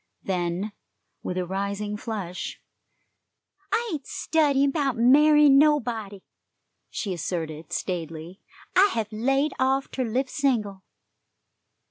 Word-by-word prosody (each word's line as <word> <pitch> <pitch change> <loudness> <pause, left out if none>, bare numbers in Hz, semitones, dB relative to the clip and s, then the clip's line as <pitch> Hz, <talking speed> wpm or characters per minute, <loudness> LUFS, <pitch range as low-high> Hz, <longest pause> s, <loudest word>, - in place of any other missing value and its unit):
Then, 180 +2 -2 0.5
with 180 - -4
a 180 - -1
rising 200 +3 -3
flush: 205 -5 -5 1.1
"I 460 +3 +1
ain't 285 -4 -5
studyin' 280 -3 +2
'bout 275 -5 -1
marryin' 290 +3 +6
nobody," 230 -10 +1 0.7
she 200 -5 -3
asserted 160 -2 -4
staidly. 165 0 -5 0.3
"I 390 +3 +6
hev 220 -2 -2
laid 270 +7 +1
off 265 +1 +1
ter 260 - -2
live 250 +3 -1
single." 225 -10 -1
225 Hz, 105 wpm, -25 LUFS, 190-275 Hz, 1.1 s, marryin